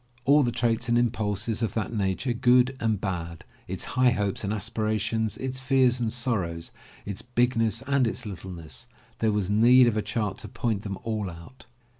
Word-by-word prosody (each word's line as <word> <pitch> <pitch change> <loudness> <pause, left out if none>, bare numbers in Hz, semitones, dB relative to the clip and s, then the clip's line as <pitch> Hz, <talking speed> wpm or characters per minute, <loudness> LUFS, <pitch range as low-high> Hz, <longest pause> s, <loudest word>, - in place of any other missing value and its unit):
All 145 +2 +6
the 120 -3 +1
traits 115 0 0
and 120 - +3
impulses 110 -2 -1
of 115 - -1
that 110 0 -2
nature, 105 +4 -1
good 125 +2 +4
and 110 -3 0
bad, 85 -4 -4 0.2
its 95 0 -3
high 130 0 +3
hopes 105 -5 -1
and 100 - -1
aspirations, 110 0 -1
its 130 0 -3
fears 130 -1 +3
and 115 -2 -1
sorrows, 100 -10 -2 0.3
its 100 -1 -4
bigness 120 -1 0
and 140 -3 +2
its 120 +2 -4
littleness, 85 -8 -8 0.2
— - - -31
there 110 -1 +2
was 105 -2 -1
need 120 +4 +6
of 120 -3 +2
a - - +2
chart 105 -2 -2
to - - -7
point 115 -4 -2
them 100 -3 -5
all 110 -4 -2
out. 85 +11 -13
110 Hz, 185 wpm, -26 LUFS, 100-125 Hz, 0.3 s, All